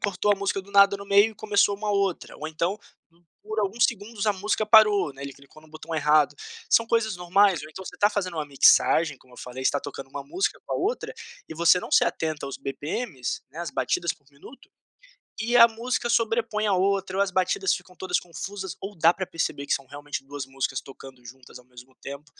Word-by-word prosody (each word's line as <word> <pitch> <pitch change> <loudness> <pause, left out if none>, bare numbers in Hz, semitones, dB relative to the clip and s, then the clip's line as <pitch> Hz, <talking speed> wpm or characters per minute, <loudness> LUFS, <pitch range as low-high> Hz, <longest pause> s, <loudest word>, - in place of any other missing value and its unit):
cortou 205 +1 +1
a - - -1
música 195 0 -2
do 200 - -17
nada 200 0 +6
no 200 - -10
meio 200 +2 +4
e - - -22
começou 205 -1 +2
uma 210 0 -3
outra, 200 -3 -1
ou 155 - -6
então 170 +6 -2 0.6
por 215 +1 -5
alguns 210 +3 +1
segundos 215 -1 -5
a - - +4
música 210 +2 -1
parou, 210 -7 +5
né, 135 - -11
ele 140 0 -6
clicou 140 +3 -18
no 155 - -19
botão 160 +1 -10
errado, 150 -1 +3 0.3
são 230 - +4
coisas 225 -4 0
normais 180 +1 +3
ou 155 - -10
então 190 +5 -10
você 180 - -9
tá 205 - +5
fazendo 185 -4 -3
uma 155 -2 -3
mixagem 145 +1 +4
como 130 -1 -23
eu - - -15
falei 125 +1 -7
você - - +4
tá 145 - -1
tocando 135 -1 -8
uma - - -6
música 355 +7 -2
com - - -6
a - - 0
outra, 420 +7 -2 0.4
e - - -7
você 170 +2 +4
não - - -8
se - - +5
atenta 155 -3 -2
aos 135 - -6
bpm's, 145 - -4
né, 160 - -12
as 170 0 -4
batidas 170 -1 0
por 145 - -24
minuto, 145 - -16 0.7
e 240 +2 +2
a 230 0 +10
música 240 +2 -3
sobrepõe 225 -2 +1
a 200 - +2
outra 190 0 0
ou 200 - +4
as 190 - -4
batidas 390 - +1
ficam 180 - -8
todas 185 -1 -1
confusas 190 +2 -7
ou 200 +1 -7
dá 165 +1 +5
pra 190 +1 -4
perceber 155 -4 -3
que - - 0
são 135 -2 -3
realmente 145 0 -6
2 140 -1 -7
músicas 135 -1 -3
tocando 135 -2 -14
juntas 125 +1 -13
ao 125 - -18
mesmo 125 +1 -16
tempo, 140 +2 -9
185 Hz, 225 wpm, -25 LUFS, 145-205 Hz, 0.7 s, a